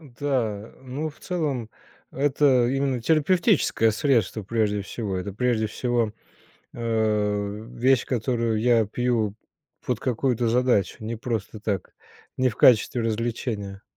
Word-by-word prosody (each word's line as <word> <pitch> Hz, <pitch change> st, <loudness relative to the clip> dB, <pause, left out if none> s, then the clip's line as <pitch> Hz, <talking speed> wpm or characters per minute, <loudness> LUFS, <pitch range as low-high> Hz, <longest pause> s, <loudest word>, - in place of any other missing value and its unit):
Да. 120 Hz, -7 st, -3 dB
Э, -, -, -23 dB
ну, 135 Hz, +5 st, -4 dB
в 150 Hz, -, -13 dB
целом- 145 Hz, -, -2 dB, 0.4 s
это 135 Hz, -3 st, +3 dB
именно 135 Hz, -1 st, 0 dB
терапевтическое 160 Hz, -, +3 dB
средство 115 Hz, -4 st, +1 dB
прежде 105 Hz, -1 st, 0 dB
всего. 100 Hz, -1 st, -4 dB
Это 90 Hz, +2 st, -4 dB
прежде 110 Hz, 0 st, 0 dB
всего, 120 Hz, -1 st, -1 dB, 0.6 s
а, 105 Hz, -3 st, 0 dB, 0.2 s
вещь, 130 Hz, 0 st, +3 dB
которую 115 Hz, -2 st, 0 dB
я 115 Hz, -2 st, +3 dB
пью 115 Hz, -2 st, 0 dB, 0.5 s
под 125 Hz, -2 st, -1 dB
какую-то 125 Hz, -2 st, 0 dB
задачу. 120 Hz, -6 st, +2 dB
Не 115 Hz, +1 st, -3 dB
просто 110 Hz, -2 st, -4 dB
так, 100 Hz, -3 st, -3 dB, 0.4 s
не 130 Hz, 0 st, +2 dB
в 110 Hz, -, -6 dB
качестве 120 Hz, 0 st, +4 dB
развлечения. 110 Hz, -3 st, -3 dB
115 Hz, 125 wpm, -25 LUFS, 110-130 Hz, 0.6 s, качестве